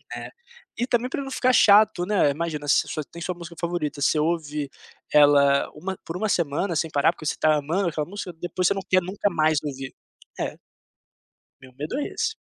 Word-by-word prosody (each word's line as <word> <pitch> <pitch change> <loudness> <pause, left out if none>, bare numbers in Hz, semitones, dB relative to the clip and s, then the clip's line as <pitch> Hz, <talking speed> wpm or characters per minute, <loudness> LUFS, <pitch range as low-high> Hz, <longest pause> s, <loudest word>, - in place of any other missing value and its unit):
É, - - -7 0.5
e 245 - -1
também 245 0 0
pra 275 - -3
não 270 - -6
ficar 255 -1 +2
chato, 205 -5 +5
né, 200 -8 +3
imagina 150 -1 -4
se 145 - +3
você 155 - -4
tem 170 - -10
sua 180 +1 -3
música 170 -1 -10
favorita, 170 -4 -2
você 155 - +3
ouve 150 -2 -1 0.4
ela 140 -1 +5
uma 190 +5 -5
por 165 - -6
uma 215 +4 -1
semana 170 +1 0
sem 160 +1 -1
parar, 145 +1 +3
porque 170 - -12
você - - +1
está 155 -1 +2
amando 165 +6 0
aquela 150 -2 -3
música 195 -1 -6
,depois 180 +1 -2
você - - +3
não 195 - -4
quer 185 0 +4
nunca 190 +3 -1
mais 155 -3 +2
ouvir, 135 -2 -6 0.5
é. - - -3 1.0
Meu 130 -1 -15
medo 150 - -4
é 290 - -2
esse. 445 - -2
170 Hz, 200 wpm, -24 LUFS, 150-190 Hz, 1.0 s, chato